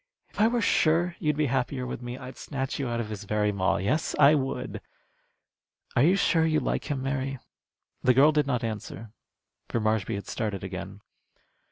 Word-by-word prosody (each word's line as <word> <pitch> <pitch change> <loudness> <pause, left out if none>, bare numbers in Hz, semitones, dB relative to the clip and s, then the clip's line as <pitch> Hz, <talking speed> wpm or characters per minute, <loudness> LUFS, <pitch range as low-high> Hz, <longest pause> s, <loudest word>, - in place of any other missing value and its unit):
If - - -3
I 220 - +6
were 240 0 +1
sure 170 +1 +2
you'd 150 -3 0
be 155 - +2
happier 130 0 -1
with 125 - -5
me, 120 +1 -6
I'd 130 0 -9
snatch 135 -1 -4
you 135 - -1
out 120 0 -2
of 110 -2 -3
his 105 -1 -6
very 105 0 +1
maw. 95 -2 +1
Yes, 125 +12 0
I 145 +1 +7
would. 135 -3 -2 1.1
Are - - +4
you 170 +7 +5
sure 170 -4 +3
you 155 -1 +2
like - - -2
him, 135 -3 -2
Mary?" 135 0 -2 0.6
The 125 -1 +4
girl 145 +4 +7
did 150 -2 +1
not 125 -4 0
answer, 110 -1 -5 0.6
for 115 - 0
Marshby 110 0 0
had 100 - -5
started 105 -4 -3
again. 95 +1 -6
130 Hz, 190 wpm, -27 LUFS, 110-150 Hz, 1.1 s, I